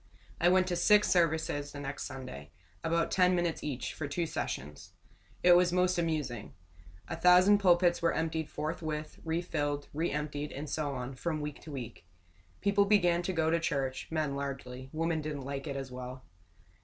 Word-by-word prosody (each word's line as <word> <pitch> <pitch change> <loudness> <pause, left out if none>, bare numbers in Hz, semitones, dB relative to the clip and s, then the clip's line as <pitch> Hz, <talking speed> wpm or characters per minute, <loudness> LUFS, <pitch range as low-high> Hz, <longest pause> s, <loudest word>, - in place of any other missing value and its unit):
I 175 0 +5
went 185 0 +4
to 180 -1 -1
six 210 +4 +5
services 160 -4 +1
the 145 - -6
next 145 0 -5
Sunday 130 - -8 0.3
about 165 0 +1
ten 180 -1 +4
minutes 175 -2 -1
each, 135 -4 -3
for 150 - -4
two 170 +4 -1
sessions. 75 - -5 0.5
It 180 0 +8
was 180 0 +4
most 180 0 +2
amusing. 150 - -2 0.5
A - - -3
thousand 180 +3 +6
pulpits 175 -2 +4
were 170 0 +3
emptied 160 -1 -2
forthwith, 155 0 -4
refilled, 145 -3 -2
re 165 +4 0
emptied, 150 0 -3
and 145 +3 -5
so 145 -1 -2
on, 125 +1 -5
from 155 +4 -2
week 150 -1 -5
to 155 - -10
week. 120 -9 -7 0.5
People 200 0 +3
began 175 -4 +4
to 180 - -2
go 160 -2 +1
to 170 - +3
church; 135 -5 -2
men 155 -3 -1
largely 135 -2 -5
women 165 0 -1
didn't 150 -3 -5
like 140 +1 -4
it 140 - -3
as 135 -1 -5
well. 125 +1 -7
155 Hz, 175 wpm, -31 LUFS, 140-175 Hz, 0.5 s, It